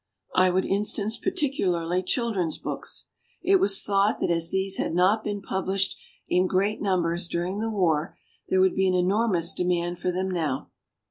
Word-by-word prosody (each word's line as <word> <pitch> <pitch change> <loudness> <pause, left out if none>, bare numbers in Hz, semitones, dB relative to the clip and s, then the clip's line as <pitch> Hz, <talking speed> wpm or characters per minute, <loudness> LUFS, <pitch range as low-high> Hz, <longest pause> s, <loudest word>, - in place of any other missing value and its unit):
I 185 0 +4
would 185 +1 +1
instance 210 +2 0
particularly 185 - 0
children's 190 - 0
books. - - -6 0.4
It 385 +2 +4
was 195 - +3
thought 200 +1 +2
that - - 0
as 165 0 +1
these 190 +1 -1
had - - -2
not 195 +5 +3
been 205 -1 -4
published 190 0 0 0.3
in 180 +1 +2
great 200 +4 0
numbers 175 -3 0
during 175 +4 -2
the 225 +1 -1
war 170 -7 0 0.3
there 190 - +3
would 190 0 +4
be 190 0 +2
an 185 - +2
enormous 185 -1 +1
de - - -1
mand 175 -1 -1
for 180 - -1
them 185 +1 -2
now. 155 -7 -2
190 Hz, 175 wpm, -26 LUFS, 175-205 Hz, 0.4 s, I